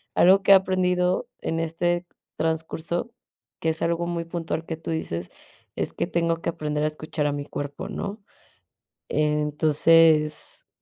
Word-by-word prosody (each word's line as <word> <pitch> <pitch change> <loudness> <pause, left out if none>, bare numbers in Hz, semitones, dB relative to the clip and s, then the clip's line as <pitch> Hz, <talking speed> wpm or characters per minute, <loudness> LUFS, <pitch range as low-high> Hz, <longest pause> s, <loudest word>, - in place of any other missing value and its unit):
algo 190 +2 +6
que 200 - +5
he - - +11
aprendido 185 +1 +2
en 165 - -2
este 175 +2 -1 0.3
transcurso, 160 +5 -2 0.5
que 160 - +1
es 160 0 -2
algo 170 0 0
muy 170 -1 -2
puntual 165 -1 -3
que 160 - -4
tú 165 - -6
dices, 90 - -3 0.4
es - - -2
que - - -1
tengo 170 -1 +1
que 165 - -3
aprender 150 -2 -2
a - - +3
escuchar 155 0 -3
a - - +1
mi 145 0 -4
cuerpo, 145 -1 -5
¿no? 205 +2 -5 0.9
Entonces, 150 +1 +3
165 Hz, 150 wpm, -25 LUFS, 150-175 Hz, 0.9 s, he